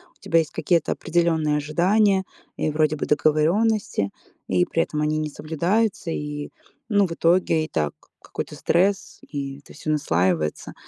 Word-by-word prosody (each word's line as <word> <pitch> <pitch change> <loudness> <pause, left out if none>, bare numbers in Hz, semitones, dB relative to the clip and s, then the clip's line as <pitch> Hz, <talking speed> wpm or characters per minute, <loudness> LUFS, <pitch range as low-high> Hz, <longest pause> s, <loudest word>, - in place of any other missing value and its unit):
у - - -33
тебя 165 - +2
есть 155 - -2
какие-то 170 -3 +1
определённые 160 -3 +1
ожидания 190 +6 +2 0.3
и 155 - 0
вроде 155 0 +1
бы - - -3
договорённости, 155 - +2 0.4
и 90 -1 +2
при 165 - +1
этом 150 0 -3
они 155 0 +1
не 155 0 -2
соблюдаются, 175 +6 -1
и, 150 -1 -4 0.4
ну, 205 -3 +3
в - - -10
итоге 165 -1 +2
и - - -8
так 75 - -1 0.3
какой-то - - -6
стресс, 195 +3 +1
и 140 -2 -6
это - - -16
всё 155 - -6
наслаивается. 90 - 0
155 Hz, 155 wpm, -23 LUFS, 150-175 Hz, 0.4 s, ну